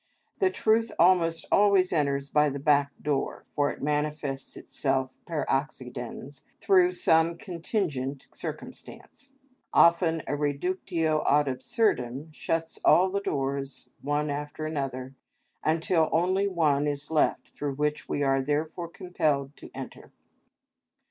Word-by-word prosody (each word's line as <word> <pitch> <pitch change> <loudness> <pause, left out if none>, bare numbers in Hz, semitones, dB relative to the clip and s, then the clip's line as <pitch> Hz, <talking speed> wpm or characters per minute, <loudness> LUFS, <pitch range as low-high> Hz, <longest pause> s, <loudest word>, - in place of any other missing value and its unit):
The 380 - +4
truth 225 -8 +1
almost 170 -2 +3
always 200 -3 +4
enters 140 -3 0
by 150 0 +4
the 140 - -4
back 140 0 +3
door, 145 -2 -2
for 145 -1 +2
it - - -7
manifests 150 -2 -2
itself 135 -2 -2
per 160 -5 -2
accidens 135 -1 -4 0.2
through 185 -3 +4
some 165 -1 +3
contingent 165 - -3
circumstance. 280 - -9 0.5
Often 170 -1 +4
a 145 - -2
reductio 155 +2 -1
ad 145 0 +4
absurdum 140 - -1
shuts 165 +1 -3
all 185 +2 +5
the 200 +1 -1
doors 135 -4 -3
one 145 +1 -1
after 145 +2 -5
another, 135 -4 -4 0.5
until 160 +1 +2
only 185 +4 +2
one 150 -6 +2
is 145 +1 -3
left 155 - +1
through 145 -2 -4
which 150 +1 -2
we 145 - 0
are 135 -1 +2
therefore 155 +5 -2
compelled 155 -6 -1
to - - -11
enter. - - -9
150 Hz, 125 wpm, -27 LUFS, 140-170 Hz, 0.5 s, all